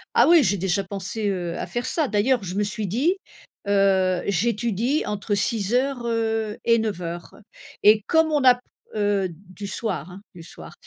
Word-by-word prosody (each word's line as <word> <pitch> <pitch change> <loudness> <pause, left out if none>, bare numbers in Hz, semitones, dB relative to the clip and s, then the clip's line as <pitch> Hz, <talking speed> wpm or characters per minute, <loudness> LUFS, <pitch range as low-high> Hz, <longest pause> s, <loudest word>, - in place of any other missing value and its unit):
Ah - - +6
oui 335 -3 +6
j'ai 200 -2 +1
déjà 190 +2 0
pensé, 200 +2 -3
heu, 175 -3 -3
à - - -4
faire 240 +1 -3
ça. 315 -4 0
D'ailleurs 225 +2 +1
je 180 0 -5
me 205 - +1
suis 210 0 -3
dit: 275 - +1 0.5
«Heu, 190 -2 +2
j'étudie 230 - 0
entre 210 0 -2
6:00 240 +5 0
heu, 225 -2 -1
et 230 0 +4
9:00» 175 -6 -5 0.5
et 210 +1 +6
comme 320 -1 +3
on 295 -3 +1
a 250 -1 +7
p 245 - -19 0.3
heu, 205 -3 +1
du 185 +4 -10
soir, 190 -6 -4
hein, 185 +2 -11
du 175 - -12
soir. 165 - -12
210 Hz, 175 wpm, -23 LUFS, 190-235 Hz, 0.5 s, a